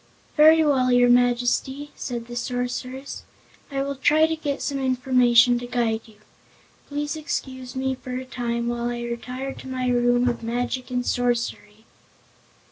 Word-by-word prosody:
"Very 315 Hz, +1 st, +7 dB
well, 260 Hz, -4 st, +3 dB
your 245 Hz, 0 st, +5 dB
Majesty," 245 Hz, +4 st, +1 dB
said 240 Hz, -2 st, -5 dB
the 240 Hz, 0 st, -9 dB
Sorceress, 250 Hz, +2 st, -4 dB, 0.5 s
"I 275 Hz, -1 st, -1 dB
will 280 Hz, 0 st, -3 dB
try 300 Hz, +3 st, +4 dB
to 320 Hz, 0 st, -1 dB
get 290 Hz, -3 st, -3 dB
some 280 Hz, -1 st, -2 dB
information 250 Hz, -2 st, +4 dB
to 245 Hz, -, -7 dB
guide 230 Hz, -2 st, -1 dB
you. 220 Hz, -, -18 dB, 0.7 s
Please 295 Hz, +1 st, -3 dB
excuse 260 Hz, -4 st, -5 dB
me 265 Hz, 0 st, -1 dB
for 255 Hz, -1 st, -6 dB
a 260 Hz, -, -5 dB
time, 235 Hz, -2 st, -3 dB
while 240 Hz, 0 st, -1 dB
I 240 Hz, 0 st, -4 dB
retire 250 Hz, +3 st, -5 dB
to -, -, -11 dB
my 255 Hz, -1 st, -2 dB
Room 245 Hz, 0 st, +3 dB
of 240 Hz, -1 st, -1 dB
Magic 245 Hz, +2 st, -3 dB
and 250 Hz, -1 st, -2 dB
Sorcery." 235 Hz, -3 st, -2 dB
250 Hz, 155 wpm, -24 LUFS, 240-265 Hz, 0.7 s, Very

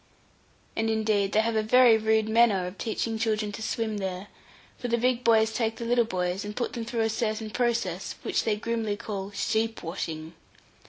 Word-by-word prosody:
And 225 Hz, 0 st, 0 dB
indeed 215 Hz, -3 st, +1 dB
they 215 Hz, -, +4 dB
have 225 Hz, 0 st, -1 dB
a 220 Hz, -, +3 dB
very 240 Hz, +1 st, +6 dB
rude 220 Hz, 0 st, +2 dB
manner 220 Hz, -4 st, +4 dB
of 180 Hz, +2 st, -8 dB
teaching 225 Hz, 0 st, -2 dB
children 215 Hz, -2 st, 0 dB
to 215 Hz, -, -7 dB
swim 220 Hz, -1 st, -2 dB
there; 190 Hz, +1 st, -4 dB, 0.5 s
for 245 Hz, -, -3 dB
the 235 Hz, 0 st, +1 dB
big 250 Hz, +1 st, +1 dB
boys 220 Hz, -1 st, +4 dB
take 225 Hz, -2 st, 0 dB
the 235 Hz, -, -6 dB
little 240 Hz, 0 st, +3 dB
boys, 180 Hz, -1 st, -2 dB
and 210 Hz, 0 st, -6 dB
put 240 Hz, -, -2 dB
them 235 Hz, -2 st, -4 dB
through 235 Hz, 0 st, -2 dB
a 220 Hz, -, +2 dB
certain 220 Hz, -1 st, -2 dB
process, 230 Hz, -7 st, -1 dB
which -, -, 0 dB
they 215 Hz, -, +1 dB
grimly 220 Hz, -1 st, -2 dB
call 200 Hz, -2 st, -5 dB
'sheep 220 Hz, +2 st, -1 dB
washing.' 165 Hz, -2 st, -5 dB
220 Hz, 195 wpm, -27 LUFS, 205-230 Hz, 0.5 s, very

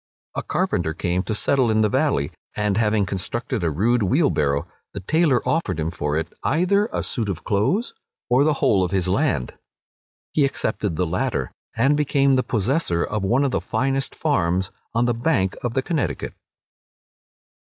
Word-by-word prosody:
A -, -, -2 dB
carpenter 80 Hz, -2 st, -1 dB
came 90 Hz, +2 st, 0 dB
to 110 Hz, +3 st, -3 dB
settle 130 Hz, +2 st, +2 dB
in 110 Hz, 0 st, +3 dB
the 105 Hz, -, +4 dB
valley, 70 Hz, -8 st, +1 dB, 0.2 s
and 105 Hz, -1 st, 0 dB
having 105 Hz, -2 st, +2 dB
constructed 100 Hz, +4 st, -3 dB
a 85 Hz, -, +2 dB
rude 110 Hz, +10 st, +1 dB
wheelbarrow, 90 Hz, -, +1 dB, 0.3 s
the -, -, -3 dB
tailor 145 Hz, -, +2 dB
offered 165 Hz, -, 0 dB
him 80 Hz, +1 st, -1 dB
for 75 Hz, -3 st, -2 dB
it, 80 Hz, -, -3 dB
either 190 Hz, +7 st, +2 dB
a -, -, -2 dB
suit 115 Hz, -5 st, -2 dB
of 85 Hz, -4 st, -4 dB
clothes, 115 Hz, -, 0 dB, 0.3 s
or 125 Hz, +3 st, +4 dB
the 155 Hz, +1 st, +3 dB
whole 100 Hz, -7 st, +3 dB
of 90 Hz, -, 0 dB
his 95 Hz, -2 st, 0 dB
land! 95 Hz, -, 0 dB, 0.8 s
He 150 Hz, -, +3 dB
accepted 110 Hz, -8 st, -1 dB
the 90 Hz, -, 0 dB
latter, 90 Hz, +2 st, -1 dB, 0.3 s
and 135 Hz, +6 st, +4 dB
became 140 Hz, -2 st, +3 dB
the 130 Hz, -, +3 dB
possessor 115 Hz, -, 0 dB
of 105 Hz, 0 st, -2 dB
one 120 Hz, +8 st, +2 dB
of 140 Hz, -, +1 dB
the -, -, 0 dB
finest 135 Hz, +1 st, -1 dB
farms 95 Hz, -, 0 dB, 0.2 s
on 120 Hz, +1 st, +3 dB
the 120 Hz, -, +2 dB
bank 115 Hz, -, 0 dB
of 120 Hz, -1 st, -3 dB
the 135 Hz, -, +1 dB
Connecticut. 130 Hz, -, -2 dB
110 Hz, 175 wpm, -22 LUFS, 90-135 Hz, 0.8 s, the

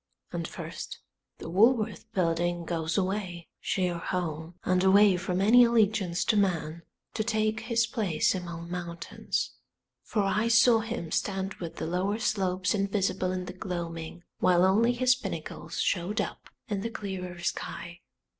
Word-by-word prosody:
And -, -, -3 dB
first -, -, -7 dB, 0.4 s
the -, -, -8 dB
Woolworth 220 Hz, +3 st, +2 dB
Building 175 Hz, -1 st, 0 dB
goes 165 Hz, -1 st, -1 dB
away, 185 Hz, -3 st, -2 dB
sheer 180 Hz, -3 st, -1 dB
home 165 Hz, -2 st, -3 dB
and 185 Hz, 0 st, +2 dB
away 195 Hz, 0 st, +6 dB
from 180 Hz, 0 st, -2 dB
any 230 Hz, +5 st, +7 dB
allegiance 215 Hz, -6 st, +2 dB
to 220 Hz, -, +3 dB
man, 170 Hz, -4 st, 0 dB, 0.3 s
to 220 Hz, -, -1 dB
take 215 Hz, -1 st, 0 dB
his 230 Hz, 0 st, +1 dB
place 205 Hz, -8 st, +1 dB
among 170 Hz, -2 st, -6 dB
mountains; 170 Hz, -2 st, -3 dB, 0.5 s
for 210 Hz, -3 st, -1 dB
I 210 Hz, +3 st, +1 dB
saw 230 Hz, 0 st, +6 dB
him 220 Hz, -7 st, -4 dB
stand 195 Hz, 0 st, -1 dB
with 170 Hz, -2 st, -5 dB
the -, -, -4 dB
lower 185 Hz, +5 st, 0 dB
slopes 190 Hz, -5 st, 0 dB
invisible 195 Hz, -2 st, 0 dB
in 185 Hz, 0 st, -3 dB
the 180 Hz, -, -7 dB
gloaming, 170 Hz, -2 st, -5 dB, 0.2 s
while 180 Hz, 0 st, +4 dB
only 225 Hz, +6 st, +4 dB
his 255 Hz, +1 st, +4 dB
pinnacles 255 Hz, -, -6 dB
showed 195 Hz, +4 st, 0 dB
up -, -, -4 dB, 0.2 s
in 200 Hz, -2 st, -2 dB
the 230 Hz, -, -2 dB
clearer 190 Hz, -5 st, -5 dB
sky. 170 Hz, -1 st, -4 dB
190 Hz, 145 wpm, -28 LUFS, 175-215 Hz, 0.5 s, any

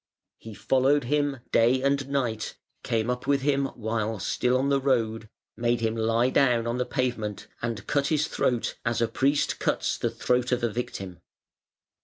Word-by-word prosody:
He 110 Hz, -2 st, -10 dB
followed 135 Hz, +4 st, +2 dB
him 145 Hz, 0 st, 0 dB
day 120 Hz, +3 st, +4 dB
and 140 Hz, 0 st, +1 dB
night, 125 Hz, -6 st, -2 dB, 0.2 s
came 115 Hz, +1 st, 0 dB
up 125 Hz, +2 st, -4 dB
with 140 Hz, -1 st, +2 dB
him 140 Hz, 0 st, +1 dB
while 110 Hz, -1 st, -2 dB
still 125 Hz, +6 st, +1 dB
on 135 Hz, +2 st, 0 dB
the 140 Hz, -1 st, +2 dB
road, 115 Hz, -5 st, 0 dB, 0.3 s
"made 120 Hz, +1 st, 0 dB
him 110 Hz, 0 st, 0 dB
lie 115 Hz, +3 st, +2 dB
down 125 Hz, -5 st, +3 dB
on 120 Hz, +1 st, -2 dB
the 125 Hz, -, -1 dB
pavement, 120 Hz, -5 st, -2 dB, 0.2 s
and 115 Hz, -2 st, -3 dB
cut 140 Hz, -1 st, +1 dB
his 150 Hz, -1 st, +1 dB
throat 120 Hz, -2 st, -1 dB
as 115 Hz, -1 st, 0 dB
a 115 Hz, -, +2 dB
priest 140 Hz, +5 st, +1 dB
cuts -, -, 0 dB
the -, -, 0 dB
throat 125 Hz, 0 st, 0 dB
of 125 Hz, -1 st, 0 dB
a 120 Hz, -, +2 dB
victim". 100 Hz, -5 st, -5 dB
125 Hz, 175 wpm, -26 LUFS, 115-135 Hz, 0.3 s, day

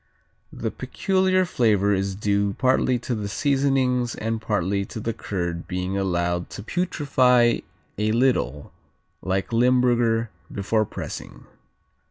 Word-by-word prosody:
The -, -, -4 dB
peculiar 185 Hz, -1 st, +1 dB
flavor 105 Hz, -, +2 dB
is 95 Hz, 0 st, -1 dB
due 100 Hz, 0 st, 0 dB
partly 130 Hz, -1 st, +2 dB
to 120 Hz, +1 st, -4 dB
the 105 Hz, -3 st, -3 dB
seasonings 135 Hz, -2 st, +1 dB
and 115 Hz, 0 st, -3 dB
partly 100 Hz, -3 st, 0 dB
to 110 Hz, -, -7 dB
the 115 Hz, +1 st, -2 dB
curd 85 Hz, -5 st, -4 dB
being 90 Hz, +1 st, -3 dB
allowed 85 Hz, -2 st, -1 dB
to 100 Hz, -, -7 dB
putrify 130 Hz, -, +2 dB, 0.4 s
a 105 Hz, +1 st, +1 dB
little, 110 Hz, -, 0 dB, 0.5 s
like 95 Hz, +5 st, -2 dB
Limburger, 120 Hz, -2 st, +3 dB, 0.2 s
before 110 Hz, +2 st, 0 dB
pressing. -, -, -8 dB
110 Hz, 120 wpm, -24 LUFS, 100-125 Hz, 0.5 s, Limburger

